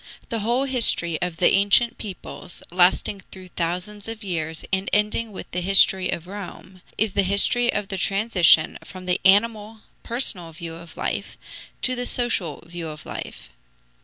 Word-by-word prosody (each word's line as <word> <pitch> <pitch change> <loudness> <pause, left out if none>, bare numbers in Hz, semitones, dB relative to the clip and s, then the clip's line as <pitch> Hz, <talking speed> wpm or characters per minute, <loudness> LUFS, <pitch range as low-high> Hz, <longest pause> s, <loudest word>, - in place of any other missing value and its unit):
The 230 - -2
whole 240 +5 0
history 230 - +3
of 175 -2 -3
the - - +4
ancient 205 +4 +3
peoples, 190 -3 -7
lasting 185 +2 +2
through 185 -1 -11
thousands 180 +5 -4
of 225 -1 -6
years 160 -4 -4
and 190 +1 0
ending 210 +2 +1
with 195 - -10
the 180 - -2
history 190 0 +5
of 170 - -3
Rome, 185 -1 -10 0.2
is 215 -2 +1
the 200 - +2
history 200 +5 +3
of 205 -1 -3
the 195 - -3
transition 195 -5 +3
from 185 -1 -11
the 180 0 0
animal, 215 +2 +2 0.2
personal 195 -9 -2
view 165 0 -7
of 165 0 -12
life - - -4 0.5
to 255 - +1
the 245 0 -2
social 210 - -1
view 170 -1 -7
of 155 0 -9
life. 65 - -8
195 Hz, 160 wpm, -23 LUFS, 175-215 Hz, 0.5 s, history